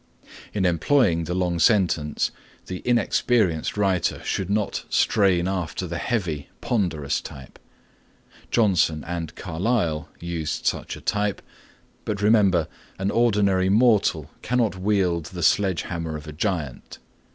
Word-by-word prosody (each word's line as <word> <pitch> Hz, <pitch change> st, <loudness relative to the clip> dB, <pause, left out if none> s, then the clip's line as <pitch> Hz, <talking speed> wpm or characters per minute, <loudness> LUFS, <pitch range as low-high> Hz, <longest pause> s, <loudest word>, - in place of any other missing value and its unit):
In 100 Hz, -3 st, -1 dB
employing 90 Hz, -, +2 dB
the 90 Hz, -, -3 dB
long 90 Hz, -2 st, 0 dB
sentence 85 Hz, -6 st, +2 dB, 0.3 s
the 90 Hz, -1 st, -6 dB
inexperienced 110 Hz, -7 st, +1 dB
writer 95 Hz, -4 st, +1 dB
should 95 Hz, -1 st, -2 dB
not 105 Hz, 0 st, -1 dB
strain 95 Hz, -5 st, +2 dB
after 90 Hz, -1 st, -3 dB
the 85 Hz, 0 st, -4 dB
heavy, 90 Hz, -, -2 dB
ponderous 85 Hz, -, -1 dB
type. 65 Hz, -2 st, -11 dB, 0.9 s
Johnson 90 Hz, -8 st, +2 dB
and 85 Hz, -2 st, -5 dB
Carlyle 85 Hz, -3 st, -1 dB
used 85 Hz, -3 st, -4 dB
such -, -, -1 dB
a -, -, -12 dB
type, 105 Hz, -1 st, -1 dB, 0.6 s
but 105 Hz, -2 st, -3 dB
remember, 100 Hz, -6 st, +3 dB, 0.3 s
an 95 Hz, +1 st, -1 dB
ordinary 100 Hz, -5 st, +2 dB
mortal 110 Hz, 0 st, +3 dB
cannot 120 Hz, -4 st, 0 dB
wield 95 Hz, -4 st, 0 dB
the 90 Hz, -1 st, -6 dB
sledge 95 Hz, -2 st, +2 dB
hammer 85 Hz, -3 st, -4 dB
of 75 Hz, -, -11 dB
a 75 Hz, -, -7 dB
giant. 80 Hz, -, -3 dB
95 Hz, 125 wpm, -24 LUFS, 85-105 Hz, 0.9 s, remember